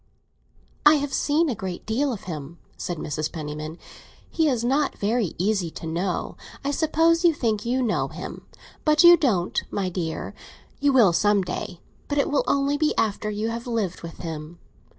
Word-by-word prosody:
"I 300 +1 +8
have 285 -1 -2
seen 310 +3 +2
a 265 - 0
great 190 -4 -6
deal 260 +6 0
of 220 - -6
him," 160 -2 -7 0.2
said 175 - -4
Mrs. 155 0 -3
Penniman. 155 0 -6 0.5
"He 320 -2 +2
is 245 -4 0
not 275 +4 +1
very 210 -2 0
easy 195 -1 0
to 160 - -9
know. 175 +3 -2 0.3
I 285 - +1
suppose 325 +3 +2
you 335 -3 +5
think 220 -4 -1
you 255 +2 +1
know 225 - 0
him; - - -8 0.4
but 305 +1 +4
you 345 0 +10
don't, 220 - +1
my 195 -2 -1
dear. 170 -3 -4 0.5
You 285 0 +3
will 230 -10 +5
some 205 +2 +3
day; 180 0 -5 0.3
but 290 - -2
it 285 - +1
will 290 - +2
only 280 +1 +1
be 310 -1 +1
after 215 0 0
you 210 +2 -2
have 230 +1 -5
lived 220 -7 -2
with 165 -1 -8
him. 160 0 -6
220 Hz, 180 wpm, -24 LUFS, 175-285 Hz, 0.5 s, you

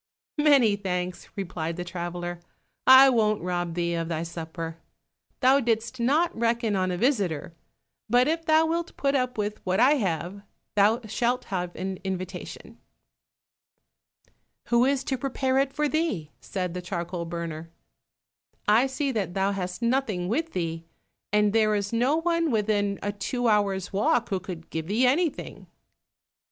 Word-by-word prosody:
"Many 275 -8 +5
thanks," 180 -2 -3
replied 170 -4 -4
the 180 - -3
traveler, 175 0 -5 0.5
"I 260 +1 +10
won't 215 -4 +2
rob 175 -2 -2
thee 170 -1 0
of 165 -1 -2
thy 165 -1 -2
supper; 165 0 -6 0.6
thou 265 +2 +5
didst 235 0 -1
not 305 +9 +2
reckon 230 -2 0
on 185 -1 +1
a 180 - -2
visitor, 190 - 0 0.6
but 245 +3 +4
if 325 +1 0
thou 315 0 +4
wilt 335 +1 -2
put 275 0 +1
up 255 -3 0
with 210 0 -3
what 185 +2 0
I 280 +5 +5
have, 185 - -2 0.3
thou 210 +4 +3
shalt 240 +4 0
have 180 -1 -2
an 190 0 -4
invitation." 185 -1 -6 1.9
"Who 235 +1 +4
is 275 0 +1
to 265 -2 -2
prepare 265 0 0
it 275 0 +1
for 300 +2 0
thee?" 290 - -1
said 180 -3 -3
the 180 - -4
charcoal 175 -1 -4
burner. 165 -1 -5 1.0
"I 225 +6 +5
see 270 +1 -2
that 200 -7 -2
thou 195 +1 +1
hast 185 +2 -4
nothing 235 -8 0
with 315 - -1
thee, 165 -2 -3 0.5
and 210 0 +3
there 215 -1 +3
is 205 +1 -2
no 250 +6 +2
one 335 0 +1
within 205 -3 +1
a 205 - -1
two 240 +5 -2
hours' 200 -4 +1
walk 240 +4 +2
who 190 - 0
could 180 -3 -9
give 160 -1 -4
thee 220 +6 +2
anything." 300 +5 0
205 Hz, 155 wpm, -26 LUFS, 180-255 Hz, 1.9 s, I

